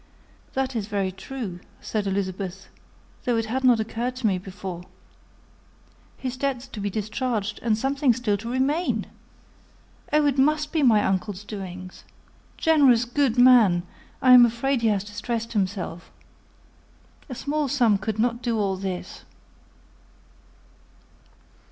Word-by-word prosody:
"That 265 -1 -1
is 210 -3 -2
very 200 -3 -1
true," 195 -2 -7 0.2
said 210 -2 -3
Elizabeth; 190 -1 -3 0.5
"though 245 -2 +1
it 225 - 0
had 255 +4 -2
not 245 -3 +5
occurred 235 +3 -3
to 250 -2 -5
me 190 -4 +2
before. 185 -2 -7 1.4
His 255 -1 -4
debts 265 -2 -2
to 215 - -8
be 205 0 -2
discharged, 215 0 -2
and 220 -2 +1
something 270 +2 +2
still 230 -3 0
to 230 +3 -7
remain! 280 +7 0 1.1
Oh, 300 0 +3
it 280 -2 +1
must 300 +2 +2
be 320 - +1
my 220 -6 +5
uncle's 190 +1 -2
doings! 185 -3 -8 0.5
Generous, 275 -7 +4
good 250 0 0
man, 235 -9 +6 0.4
I 255 - +6
am 250 -1 +10
afraid 240 +2 +1
he 230 - +2
has 205 -3 +1
distressed 230 +2 -4
himself. 185 -4 -3 1.2
A 255 - -5
small 295 +3 -1
sum 240 -7 +3
could 215 +1 -3
not 235 +1 0
do 235 -2 -1
all 195 -3 0
this." 185 -1 -6
225 Hz, 135 wpm, -24 LUFS, 200-255 Hz, 1.4 s, am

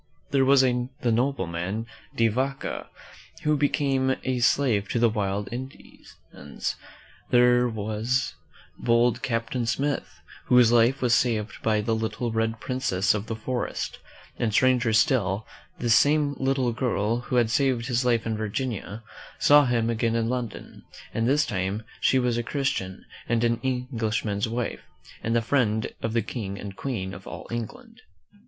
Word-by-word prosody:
There 135 -1 +3
was 135 0 +6
the 125 -1 +1 0.2
nobleman, 110 -5 -1 0.3
De 115 - +3
\''aca, 135 +5 -2 0.6
who 150 0 +3
became 135 -2 +1
a 130 -1 -1
slave 115 -5 +2
to - - -1
the 115 -1 +3
wild 100 -1 -2
Indians. 130 +2 -9 0.2
Then 70 - -12 0.7
there 125 0 +4
was 110 +4 -1 0.5
bold 120 0 +2
Captain 115 0 -2
Smith, 140 +5 -2 0.3
whose 125 -2 +5
life 120 +3 +3
was 120 -2 +3
saved 115 -3 0
by 110 -1 +1
the 110 +2 0
Little 110 +1 -2
Red 110 0 -1
Princess 100 -8 0
of 105 +1 -4
the 115 - -3
Forest; 120 +3 -3 0.4
and 115 - +1
stranger 125 0 +3
still, 110 -4 +2 0.3
this 120 -2 +2
same 145 +4 +4
little 130 -2 +1
girl, 115 -2 0
who 125 +1 -4
had 120 -2 +3
saved 130 -2 +1
his 125 -1 0
life 120 -2 +2
in 110 -1 -1
Vir 110 0 -3
ginia, 110 -2 -4 0.3
saw 145 0 +6
him 120 -2 +1
again 115 0 0
in 115 -1 +1
London, 120 -3 -5 0.3
and 115 +1 0
this 145 +2 +3
time 100 -2 -2 0.2
she 130 - +3
was 125 -2 +1
a - - +1
Christian 120 -8 -3 0.2
and 120 0 +2
an 115 0 +2
Englishman's 115 -5 -1
wife, 120 +1 -3 0.4
and 115 +1 -1
the 115 - +2
friend 110 -4 +1
of 115 - -2
the 115 -2 +1
King 100 -3 -5
and 100 -1 -7
Queen 95 -8 -4
of 95 - -10
all - - -8
England. 225 - -6
115 Hz, 155 wpm, -26 LUFS, 110-130 Hz, 0.7 s, was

